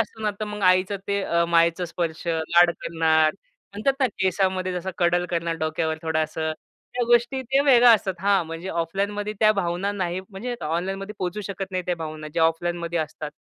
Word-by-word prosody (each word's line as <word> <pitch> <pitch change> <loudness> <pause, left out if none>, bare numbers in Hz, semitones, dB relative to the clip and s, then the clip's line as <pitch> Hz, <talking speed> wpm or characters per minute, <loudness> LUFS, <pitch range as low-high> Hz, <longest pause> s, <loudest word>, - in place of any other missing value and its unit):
असतो 220 0 -2
तर - - 0
मग 210 -1 -6
आईचं 185 +2 +3
ते 200 0 0
अ, 170 -2 +1
मायेचा 170 +1 +3
स्पर्श 165 0 -4
लाड 170 +1 +4
करणार. 160 -1 +2 0.4
म्हणतात 215 +7 +1
ना 260 - +5
केसामध्ये 185 0 0
जसा 180 +1 -3
कडल 175 0 +2
करणार 170 -1 -1
डोक्यावर 160 0 -1
थोडासा 160 0 -1 0.4
त्या 245 -1 0
गोष्टी 240 +2 +3
ते 265 +3 +2
वेगळ्या 245 -3 +7
असतात. 195 -3 +1
हां, 195 -2 +3
म्हणजे 165 +3 -6
ऑफलाईनमध्ये 200 +5 -2
त्या 215 0 +6
भावना 195 0 -1
नाही 185 -2 -2
म्हणजे 235 +5 -5
ऑनलाईनमध्ये 195 +6 -3
पोहचू 185 +3 -3
शकत 195 -1 -5
नाही 185 -1 -2
त्या 180 - +1
भावना 155 -1 -6
ज्या 165 - +2
ऑफलाईनमध्ये 170 +1 -1
असतात. 155 -1 -4
180 Hz, 175 wpm, -24 LUFS, 165-200 Hz, 0.4 s, वेगळ्या